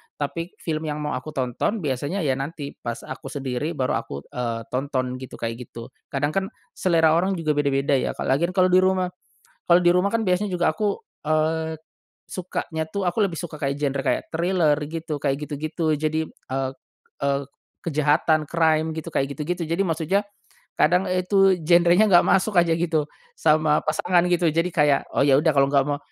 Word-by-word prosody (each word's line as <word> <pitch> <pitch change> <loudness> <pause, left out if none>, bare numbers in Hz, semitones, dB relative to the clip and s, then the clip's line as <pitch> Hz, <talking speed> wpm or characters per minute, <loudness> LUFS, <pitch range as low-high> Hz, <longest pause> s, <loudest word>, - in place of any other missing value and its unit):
Tapi 165 +5 -4
film 155 -1 -2
yang 150 0 -3
mau 150 - -2
aku 150 +4 -5
tonton 135 - -1
biasanya 145 +7 -2
ya 135 -2 0
nanti 145 0 -5
pas 120 -1 -5
aku 130 +1 -8
sendiri 135 +3 -3
baru 130 -3 0
aku, 70 +1 -8
eee, 115 -2 -3
tonton 130 -1 -2
gitu 130 -1 -9
kayak 115 0 -4
gitu. 115 +2 -10 0.2
Kadang 145 +2 -1
kan 195 +2 -1 0.2
selera 165 -3 +3
orang 185 +4 +2
juga 165 -3 -1
beda-beda 140 -2 +1
ya - - -2
ka - - -4
lagian 170 +8 +1
kalau 185 -1 +4
di 185 - +6
rumah. 185 -1 +1 0.6
Kalau 175 +1 +5
di 175 - +6
rumah 180 +2 +2
kan 225 +2 0
biasanya 185 +2 +1
juga 175 -2 +2
aku, 205 +4 -1 0.3
eee, 160 +1 0 0.5
sukanya 165 -3 -4
tuh 195 +4 -3
aku 175 +5 -1
lebih 165 - -7
suka 155 -3 -6
kayak 140 -2 -1
genre 140 -1 -1
kayak - - 0
thriller 165 -3 +2
gitu, 160 -2 -4
kayak 140 -2 +1
gitu-gitu. 155 +2 -2
Jadi, 155 +1 -1
eee 135 -2 -4 0.5
eee, 140 0 +1 0.4
kejahatan, 155 0 +2
crime 160 0 +1
gitu 160 +1 -6
kayak 140 -2 -1
gitu-gitu, 170 +3 -3
jadi 165 +4 0
maksudnya 170 +2 0 0.6
kadang 180 +5 +3
itu 185 +1 +3
genrenya 175 +5 +5
nggak 175 -2 +6
masuk 195 0 +3
aja 170 -1 +4
gitu 160 -3 0 0.3
sama 155 -1 +3
pasangan 175 +3 +2
gitu 175 -2 +3
jadi 165 +3 +1
kayak, 150 -4 +3
"Oh - - +3
ya 135 -1 +5
udah 160 +2 +3
kalau 135 0 +4
nggak 140 -1 +3
mau," 145 -1 -1
155 Hz, 180 wpm, -23 LUFS, 140-175 Hz, 0.6 s, di